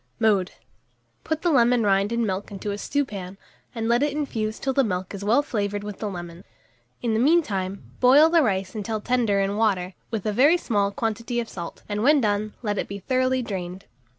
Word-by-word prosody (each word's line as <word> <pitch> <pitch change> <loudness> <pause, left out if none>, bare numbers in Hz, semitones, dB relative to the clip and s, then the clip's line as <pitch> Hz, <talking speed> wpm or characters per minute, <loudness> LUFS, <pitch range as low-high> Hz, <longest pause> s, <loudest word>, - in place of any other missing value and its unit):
Mode. 205 -5 +3 0.7
Put 315 0 -3
the 350 - +3
lemon 245 -3 +4
rind 200 +1 +2
and 235 0 +1
milk 195 0 -3
into 205 +1 -5
a 200 - -3
stewpan, 200 -9 -3 0.4
and 225 -1 -2
let 235 +1 +3
it 290 -1 +1
infuse 220 -7 -2
till 270 - -2
the 275 - +3
milk 185 -4 -3
is 200 0 -6
well 235 +8 +3
flavoured 205 -6 -2
with 210 -1 -7
the 210 - -3
lemon; 175 -2 -8 0.6
in 235 -2 +1
the 220 - +1
mean 325 +7 +4
time, 195 -4 -4 0.2
boil 275 +5 +7
the 330 0 +4
rice 195 -7 0
until 215 +1 -3
tender 230 -3 +1
in 195 +1 0
water, 195 -4 +1 0.2
with 225 -4 -4
a 210 - 0
very 285 +10 +5
small 205 -11 0
quantity 230 +3 -2
of 235 - -3
salt, 170 -5 -8
and, 210 0 -2
when 290 +5 +5
done, 210 -2 -1
let 205 -2 -1
it - - -2
be 200 - -6
thoroughly 255 +4 0
drained. 185 -3 -5
215 Hz, 205 wpm, -24 LUFS, 200-250 Hz, 0.7 s, boil